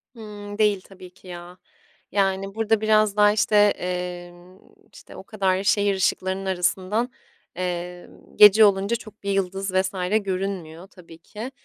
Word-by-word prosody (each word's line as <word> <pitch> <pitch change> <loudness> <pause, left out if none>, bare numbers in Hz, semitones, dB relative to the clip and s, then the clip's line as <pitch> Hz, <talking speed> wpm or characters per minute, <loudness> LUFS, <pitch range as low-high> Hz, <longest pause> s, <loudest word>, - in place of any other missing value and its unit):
Hımm, 205 -2 -9
değil 210 -3 +2
tabii 185 -1 -14
ki 190 - -19
ya. 175 0 -10 0.5
Yani, 195 0 -1
burada 225 -1 +1
biraz 215 -1 +2
daha, 210 0 +5
işte, 210 0 0
emm, 180 -2 -1 0.4
işte, - - -14
o - - -10
kadar 195 -3 -1
şehir 200 -1 +2
ışıklarının 190 +1 -1
arasından, 190 +6 -1 0.4
emm, 180 +1 -7
gece 210 +1 +8
olunca 200 +3 +1
çok 215 -3 -11
bir 200 - -2
yıldız 195 0 -2
vs. 190 0 +1 0.3
görünmüyor, 185 -3 -5
tabii 170 -4 -16
ki, 215 +9 -9
195 Hz, 140 wpm, -23 LUFS, 180-210 Hz, 0.5 s, gece